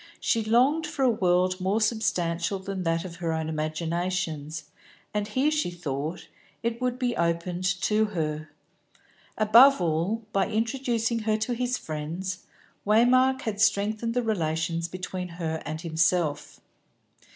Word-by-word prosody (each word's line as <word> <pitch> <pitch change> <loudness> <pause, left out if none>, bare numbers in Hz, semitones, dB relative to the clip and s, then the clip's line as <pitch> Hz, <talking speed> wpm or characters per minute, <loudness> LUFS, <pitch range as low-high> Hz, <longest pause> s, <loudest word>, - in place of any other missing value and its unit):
She 225 -2 +1
longed 255 +9 +3
for 275 - -2
a 250 - +5
world 185 -2 +1
more 195 +4 +1
substantial 195 -5 0
than 190 0 -5
that 165 0 0
of 170 -2 -8
her 170 -2 -2
own 160 -1 -2
imaginations, 160 0 -2 0.5
and 210 -1 -1
here, 260 +7 +1
as - - -1
she 300 -11 0
thought, 155 -1 -4 0.4
it 235 +1 -2
would 250 -1 0
be 245 -2 -1
opened 170 +2 -1 0.2
to 215 0 +2
her. 155 -6 -3 0.9
Above 230 +5 +7
all, 175 +7 0
by 195 - +2
introducing 230 0 0
her 215 -1 +1
to 220 +3 -1
his 250 +1 -1
friends, 165 +5 -5 0.4
Waymark 255 +5 +4
had 205 -2 -3
strengthened 215 +2 +1
the 245 - +1
relations 165 -5 -1
between 185 0 -5
her 160 -2 -3
and 155 +1 -4
himself. 165 -1 0
185 Hz, 140 wpm, -27 LUFS, 165-225 Hz, 0.9 s, Above